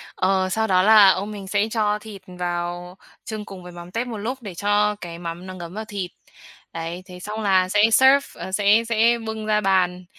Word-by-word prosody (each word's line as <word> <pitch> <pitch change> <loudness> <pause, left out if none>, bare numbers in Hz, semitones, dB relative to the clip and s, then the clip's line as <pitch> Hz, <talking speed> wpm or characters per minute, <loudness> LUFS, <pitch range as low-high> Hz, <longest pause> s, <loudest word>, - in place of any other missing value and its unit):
Ờ, 185 0 +1
sau 220 +3 0
đó 185 -1 +3
là 210 -2 +8
ông 200 +3 0
mình 200 -2 -8
sẽ 205 +2 +1
cho 210 -2 0
thịt 210 -3 -11
vào 175 0 -4 0.3
chưng 215 -1 -6
cùng 185 -2 -10
với 180 - -10
mắm 175 +1 -11
tép 235 +4 -2
một 230 -3 -5
lúc 250 +5 -4
để 200 -5 -7
cho 205 +2 +1
cái 170 -1 -7
mắm 170 +1 -6
nó 185 - -7
ngấm 175 -1 -9
vào 220 +1 -5
thịt. 195 -4 -5 0.6
Đấy, 165 +2 -5
thế 180 -2 -11
xong 210 +3 -5
là 190 -2 +2
sẽ 205 +1 +3
serve 265 +4 +5 0.2
ờ, 190 - -6
sẽ 205 +3 +3
sẽ 230 +1 +3
bưng 220 -1 -4
ra 210 0 +1
bàn, 185 -2 +1
195 Hz, 220 wpm, -22 LUFS, 180-215 Hz, 0.6 s, là